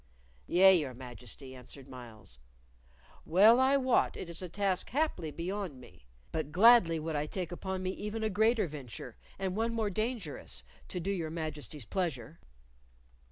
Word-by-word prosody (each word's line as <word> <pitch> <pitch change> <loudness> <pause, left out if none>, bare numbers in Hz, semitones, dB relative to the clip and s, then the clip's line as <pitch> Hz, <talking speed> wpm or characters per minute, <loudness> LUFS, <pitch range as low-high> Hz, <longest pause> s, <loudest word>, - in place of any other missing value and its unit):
"Yea, 190 +2 +7
your 145 -8 0
Majesty," 125 +1 -7
answered 130 +1 -11
Myles, 115 - -10 0.8
"well 210 +8 +6
I 265 +2 +5
wot 260 -2 +2
it 170 - -6
is 165 - -4
a 180 - -5
task 195 0 0
haply 275 - 0
beyond 175 -2 -4
me. 60 - -16 0.2
But 155 -2 -3
gladly 185 -3 +6
would 160 0 -3
I 150 +1 -1
take 180 +1 -4
upon 190 +1 -4
me 185 - 0
even 210 +3 -4
a 220 - +1
greater 220 +2 +3
venture, 130 -5 -8 0.2
and 190 -1 -2
one 230 +2 0
more 220 -3 0
dangerous, 225 +4 -3 0.2
to 180 - -4
do 195 +4 -2
your 170 -5 -2
Majesty's 150 -5 -5
pleasure!" 160 - -3
175 Hz, 160 wpm, -32 LUFS, 145-205 Hz, 0.8 s, Yea